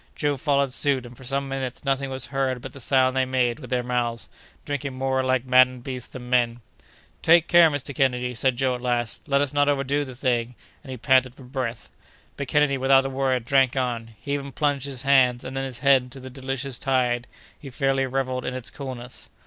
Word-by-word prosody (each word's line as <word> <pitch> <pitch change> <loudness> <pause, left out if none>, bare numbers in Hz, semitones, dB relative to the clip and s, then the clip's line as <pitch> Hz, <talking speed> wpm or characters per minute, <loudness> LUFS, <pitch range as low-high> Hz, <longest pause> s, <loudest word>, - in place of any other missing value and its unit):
Joe 145 -1 0
followed 140 -1 +1
suit, 135 -3 +1
and 120 +1 -11
for 130 - -14
some 135 +2 -1
minutes 135 -1 -5
nothing 135 0 0
was 130 -2 -4
heard 135 -2 0
but - - -9
the 140 - -10
sound 130 0 +2
they 130 - +3
made 130 -1 0
with 125 -5 -10
their 125 0 0
mouths, 120 -2 -2 0.4
drinking 140 -2 -3
more 130 0 0
like 130 -1 0
maddened 130 -1 +4
beasts 125 -2 -5
than 125 -1 -9
men. 120 -1 +1 0.6
"Take 170 0 +5
care, 170 -2 +7
Mr. 145 -1 -4
Kennedy," 125 -1 0
said 130 +2 +1
Joe 130 0 +1
at 125 - -5
last; 120 0 -2
"let 140 -1 +2
us 145 -1 -1
not 145 0 +3
overdo 140 +1 0
the 130 -3 -8
thing!" 120 -2 -1 0.3
and 140 - -13
he 130 - -5
panted 130 +1 +3
for 135 - -14
breath. 125 -3 -5 0.4
But 140 - -5
Kennedy, 145 -1 +2
without 135 0 +4
a 135 - -3
word, 130 -3 0
drank 135 -1 +3
on. 115 -3 -2
He 140 - -4
even 140 -1 -4
plunged 145 -2 0
his 135 -2 -5
hands, 130 -3 +4
and 130 +1 -7
then 135 0 -2
his 130 -2 -6
head, 135 -1 +6
into 125 +1 -9
the 130 0 -9
delicious 135 -1 -4
tide—he 125 +1 -2
fairly 135 0 0
revelled 130 -1 -2
in 125 - -3
its 130 -2 -4
coolness. 125 -3 -7
130 Hz, 215 wpm, -24 LUFS, 125-135 Hz, 0.6 s, care